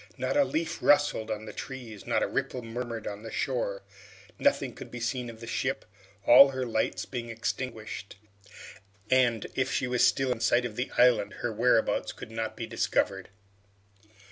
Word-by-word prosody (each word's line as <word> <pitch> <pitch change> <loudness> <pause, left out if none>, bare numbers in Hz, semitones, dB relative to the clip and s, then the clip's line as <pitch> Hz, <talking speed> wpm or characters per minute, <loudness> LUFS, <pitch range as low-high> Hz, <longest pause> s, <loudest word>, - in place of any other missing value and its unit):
Not - - -1
a 290 - +6
leaf 165 - -2
rustled 145 -7 +3
on 110 0 -3
the - - -8
trees, 120 -6 -8
not - - +2
a - - +1
ripple 125 - -2
murmured 115 -1 -5
on 100 0 -5
the 115 - -7
shore. 110 -6 -2 0.6
Nothing - - +2
could - - -10
be 125 - -7
seen 120 +1 -2
of 115 -1 -11
the - - -6
ship, 130 +3 -2 0.4
all 140 +3 +9
her 130 -1 -3
lights 110 -5 -1
being 120 -2 -5
extinguished, 115 -2 -4 1.0
and 120 -4 +3
if 130 0 0
she - - 0
was 125 -1 +1
still 135 -1 +3
in 125 - -2
sight 120 +1 +3
of 115 -3 -5
the 125 +2 -2
island, 125 -4 +4
her 120 - -1
whereabouts 115 +1 +2
could - - -10
not 115 0 -4
be 115 - -3
discovered. 100 -4 -1
120 Hz, 175 wpm, -28 LUFS, 110-130 Hz, 1.0 s, all